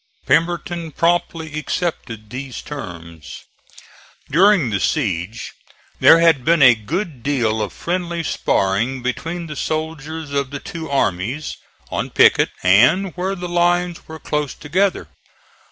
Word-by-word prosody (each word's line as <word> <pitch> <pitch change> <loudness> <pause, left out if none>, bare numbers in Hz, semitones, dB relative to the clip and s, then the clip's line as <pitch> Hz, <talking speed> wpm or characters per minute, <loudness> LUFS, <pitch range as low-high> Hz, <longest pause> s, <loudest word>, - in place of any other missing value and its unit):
Pemberton 165 +2 0
promptly 165 -1 0
accepted 115 -11 -4
these 130 0 -6
terms. 85 - -9 0.9
During 180 - +4
the 100 - 0
siege 105 - -2 0.5
there 165 - +8
had 165 -6 +4
been 165 0 +4
a 125 -2 +9
good 150 - -4
deal 115 -5 0
of 105 - -3
friendly 170 -1 -3
sparring 115 +1 0
between 165 +7 -3
the 150 -2 -7
soldiers 155 0 -4
of 140 -1 -1
the 140 0 -6
two 160 +1 -7
armies, 130 +2 -1 0.4
on - - -2
picket - - +4
and 130 - +4
where 190 +2 -2
the 180 -1 -5
lines 175 0 0
were 160 - -8
close 150 -2 -3
together. 185 +6 0
150 Hz, 125 wpm, -20 LUFS, 125-170 Hz, 0.9 s, a